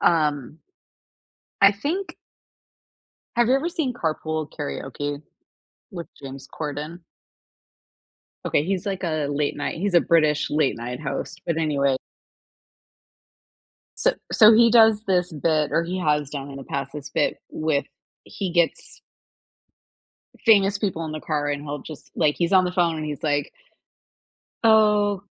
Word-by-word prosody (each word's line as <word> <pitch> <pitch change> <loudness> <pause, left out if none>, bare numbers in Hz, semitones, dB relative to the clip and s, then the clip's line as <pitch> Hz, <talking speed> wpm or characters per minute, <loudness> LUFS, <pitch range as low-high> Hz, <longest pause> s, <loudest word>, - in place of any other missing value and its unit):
um 150 -3 +1 1.0
I 200 0 +8
think 310 - -4 1.2
Have 240 -1 +3
you 255 - +4
ever 280 +5 0
seen 315 -7 -2
Carpool 155 -5 -2
Karaoke 145 -1 -4 0.7
with 175 -4 -7
James 135 0 -9
Corden? 155 +3 -6 1.5
Okay, 145 - +1
he's, 185 0 -2
like, 195 -2 -3
a 155 -3 -1
late 145 0 -1
night 145 - -3
he's 200 +1 -1
a 175 - +6
British 155 -3 +2
late 150 -2 +1
night 120 +2 -6
host, 150 +4 -5
but 165 -2 -1
anyway 140 -4 +1 2.0
So - - +2 0.2
so 220 -1 +7
he 230 +1 +6
does 220 -2 +5
this 180 -2 +1
bit 155 -1 0
or 165 - +2
he 180 +2 -3
has 150 -4 +1
done, 140 -1 -6
in 140 - -9
the 135 - -8
past, 140 0 -4
this 150 -1 -7
bit - - 0
with 155 -2 -1 0.4
he 190 -3 -5
gets 170 -1 0 1.5
famous 200 -2 +5
people 190 -5 -2
in 155 - -5
the 155 - -5
car, 150 -1 -2
and 145 0 -3
he'll 145 0 -4
just 155 +1 -11
like, 150 -2 +2
he's 170 +2 0
on 185 -1 +6
the 180 - -2
phone, 175 -3 +1
and 155 - -4
he's 150 -1 -5
like 145 -2 0 1.1
"Oh, 210 -3 +4
160 Hz, 145 wpm, -23 LUFS, 145-195 Hz, 2.0 s, I